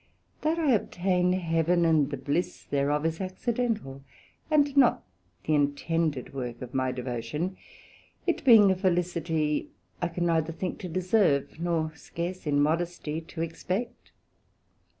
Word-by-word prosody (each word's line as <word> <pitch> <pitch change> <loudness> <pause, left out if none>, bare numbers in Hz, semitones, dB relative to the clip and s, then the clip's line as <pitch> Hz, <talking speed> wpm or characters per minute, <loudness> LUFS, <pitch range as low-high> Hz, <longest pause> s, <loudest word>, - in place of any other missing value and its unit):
That 315 +2 +1
I 310 -5 +2
obtain 180 -4 +1
Heaven, 170 -1 +2
and 155 -4 +3
the 140 - -4
bliss 155 +7 -2
thereof, 145 +2 0
is 165 +2 -1
accidental, 210 - -2 0.5
and 290 -2 +3
not 270 -4 +4 0.4
the 155 - 0
intended 145 0 0
work 125 -2 -5
of 125 - -9
my 130 -1 +1
devotion; 125 +8 -3 0.7
it 350 - 0
being 220 -7 +8
a - - +2
felicity 170 -4 0 0.3
I 175 - +1
can 175 +1 -2
neither 165 -1 +1
think 180 +2 -4
to 180 - -6
deserve, 175 -6 +1
nor 165 -2 -1
scarce 170 +3 -5
in 145 -1 +2
modesty 160 +1 0
to 165 0 -5
expect. 185 +8 -4
165 Hz, 135 wpm, -28 LUFS, 150-185 Hz, 0.7 s, being